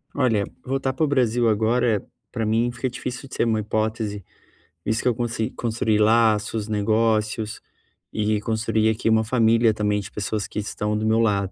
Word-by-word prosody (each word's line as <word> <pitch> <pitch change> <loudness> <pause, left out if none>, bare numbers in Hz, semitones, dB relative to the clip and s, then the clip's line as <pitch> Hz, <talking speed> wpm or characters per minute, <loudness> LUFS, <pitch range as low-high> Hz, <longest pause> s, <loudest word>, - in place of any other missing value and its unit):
Olha, 115 -7 +2 0.2
voltar 135 0 -1
para 135 - -1
o - - +3
Brasil 120 -4 +2
agora, 110 0 +1 0.3
para 115 - -2
mim 115 +3 +1
fica 130 +1 -3
difícil 125 +2 -6
de 130 - -9
ser - - +1
uma 110 -2 +1
hipótese, 110 -1 -2 0.6
isso 110 +1 0
que - - -1
eu 120 - +2
consegui 115 0 -2
construi 110 -2 0
laços, 110 -1 +2
negócios, 110 0 0 0.5
e 105 0 0
construi 110 0 +1
aqui 110 +1 0
uma 110 0 +4
família 115 -1 +3
também 105 -1 0
de 100 - -8
pessoas 105 0 -3
que - - -5
estão 105 0 -2
do 110 - -2
meu 110 +1 +3
lado. 100 -4 +1
110 Hz, 175 wpm, -23 LUFS, 105-115 Hz, 0.6 s, uma